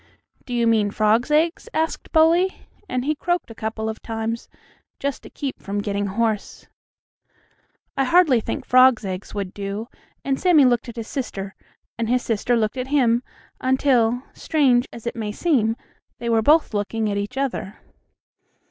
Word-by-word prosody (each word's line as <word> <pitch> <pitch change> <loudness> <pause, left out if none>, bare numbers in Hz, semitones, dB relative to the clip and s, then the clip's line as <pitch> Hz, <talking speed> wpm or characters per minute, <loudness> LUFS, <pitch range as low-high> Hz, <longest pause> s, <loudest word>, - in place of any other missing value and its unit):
"Do 245 - -3
you 235 -1 +2
mean 220 -3 +3
frogs' 215 +5 +2
eggs?" 325 +8 +1
asked 320 +1 -2
Bully, 335 +4 +3 0.2
and 255 0 -1
he 305 - +2
croaked 350 -3 -2
a - - -7
couple 220 0 -4
of 220 0 -5
times, 225 0 -4 0.5
just 280 -1 -3
to - - -12
keep 275 -2 -5
from 200 +1 -4
getting 205 0 -1
hoarse. 215 +1 -2 1.3
"I 270 - +1
hardly 300 -5 +4
think - - -4
frogs' 255 -3 +5
eggs 190 +2 -5
would 195 -2 -4
do," 200 +2 -5 0.4
and 270 -1 0
Sammie 335 -7 +5
looked 245 -1 +1
at 235 - -9
his 230 -2 -6
sister, 200 -7 -5 0.5
and 230 -1 -1
his 250 0 +2
sister 235 +2 +1
looked 215 +2 -1
at 255 0 -3
him, 245 -4 +3 0.4
until, 255 -2 +2
strange 260 -6 +2
as 235 - -11
it 235 - -3
may 215 -3 -3
seem, 225 -4 +1 0.4
they 235 - -4
were 225 -1 +3
both 300 +2 +4
looking 215 +2 -1
at 200 - -1
each 205 +6 -4
other. 255 -7 -2
235 Hz, 165 wpm, -22 LUFS, 220-270 Hz, 1.3 s, frogs